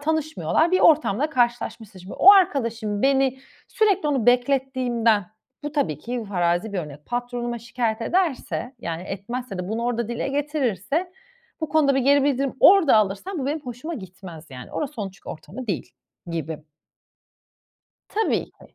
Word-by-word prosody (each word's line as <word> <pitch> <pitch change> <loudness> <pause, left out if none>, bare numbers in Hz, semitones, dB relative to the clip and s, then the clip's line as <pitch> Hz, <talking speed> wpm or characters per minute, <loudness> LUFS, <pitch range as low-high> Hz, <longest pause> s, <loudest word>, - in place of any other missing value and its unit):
tanışmıyorlar, 315 +2 0
bir 370 - +3
ortamda 300 -2 +4
karşılaşmışsın 230 -5 -1
şimdi. 185 +2 -10
O 395 - +8
arkadaşım 230 - +1
beni 270 -1 +2 0.3
sürekli 400 -8 +2
onu 260 -5 0
beklettiğimden, 245 -5 +2 0.4
bu 295 0 -5
tabii 160 - -1
ki 240 +4 -4
farazi 175 +2 0
bir 190 - -2
örnek, 150 -2 -8
patronuma 240 -1 -3
şikâyet 230 -1 -2
ederse, 300 -5 -1
yani, 170 -4 -5
etmezse 200 +2 -5
de 180 +1 -4
bunu 225 +2 -2
orada 235 -2 -1
dile 240 +3 -3
getirirse, 290 - -1 0.5
bu 315 - -2
konuda 295 -3 +3
bir 270 - +2
geri 280 +2 +4
bildirim 275 -1 0
orada 360 - +7
alırsam, 215 - 0
bu 265 - -2
benim 300 +2 -1
hoşuma 255 +6 -6
gitmez 180 - -10
yani. 125 -1 -10
Orası 295 -1 -3
çünkü 235 - -6 0.3
onun - - -3
ortamı 255 +9 -10
değil 190 -6 -3 0.4
gibi. 160 -1 -4 1.5
Tabii 440 +1 0
ki. - - -20
245 Hz, 150 wpm, -23 LUFS, 205-290 Hz, 1.5 s, O